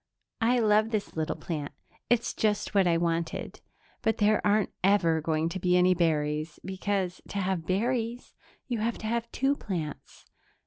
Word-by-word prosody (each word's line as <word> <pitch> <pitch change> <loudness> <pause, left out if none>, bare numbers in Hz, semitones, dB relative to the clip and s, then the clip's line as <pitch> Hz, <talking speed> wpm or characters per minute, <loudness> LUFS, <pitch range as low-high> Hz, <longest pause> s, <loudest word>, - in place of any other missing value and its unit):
"I 240 +2 +3
love 215 -1 +3
this 215 -3 -3
little 160 -1 -1
plant; 150 -4 -5 0.4
it's 240 0 +2
just 210 -1 0
what 195 -3 +4
I 170 -1 +3
wanted... 165 -1 -2 0.4
but 220 -1 +1
there 215 0 +3
aren't 210 0 +2
ever 175 -5 +3
going 160 0 0
to 185 - -4
be 180 0 +3
any 180 +1 +5
berries, 155 -2 0
because, 190 -1 -2
to - - -6
have 185 -4 -1
berries, 235 +4 -1 0.3
you 240 -4 -2
have 230 +2 -1
to - - -8
have 235 +1 -2
two 275 +2 +1
plants. 165 - -6
190 Hz, 165 wpm, -28 LUFS, 165-220 Hz, 0.4 s, any